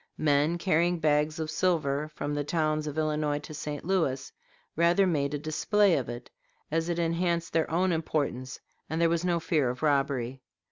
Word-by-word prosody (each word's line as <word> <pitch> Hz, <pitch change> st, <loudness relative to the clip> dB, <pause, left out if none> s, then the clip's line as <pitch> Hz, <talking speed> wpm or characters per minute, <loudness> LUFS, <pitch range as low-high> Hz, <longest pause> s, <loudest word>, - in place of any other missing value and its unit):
Men 150 Hz, +2 st, +2 dB
carrying 175 Hz, 0 st, +2 dB
bags 155 Hz, -1 st, +1 dB
of 155 Hz, -1 st, -3 dB
silver 155 Hz, -4 st, 0 dB
from 145 Hz, -, -3 dB
the 145 Hz, 0 st, -1 dB
towns 155 Hz, 0 st, 0 dB
of 150 Hz, 0 st, -5 dB
Illinois 150 Hz, -1 st, 0 dB
to 150 Hz, +1 st, -8 dB
St. 150 Hz, 0 st, -5 dB
Louis 160 Hz, -8 st, 0 dB, 0.4 s
rather 170 Hz, +4 st, +4 dB
made 150 Hz, -5 st, 0 dB
a -, -, -1 dB
display 175 Hz, +6 st, +2 dB
of 125 Hz, -4 st, -2 dB
it, 120 Hz, +1 st, -8 dB, 0.4 s
as 165 Hz, +2 st, 0 dB
it 170 Hz, -, -1 dB
enhanced 170 Hz, 0 st, 0 dB
their 165 Hz, -1 st, +1 dB
own 180 Hz, +3 st, +1 dB
importance, 145 Hz, -6 st, -2 dB, 0.3 s
and 160 Hz, +2 st, -2 dB
there 170 Hz, 0 st, +4 dB
was 170 Hz, 0 st, 0 dB
no 175 Hz, -1 st, +1 dB
fear 155 Hz, -5 st, +1 dB
of 125 Hz, +4 st, -5 dB
robbery. 135 Hz, -3 st, 0 dB
155 Hz, 180 wpm, -28 LUFS, 145-170 Hz, 0.4 s, rather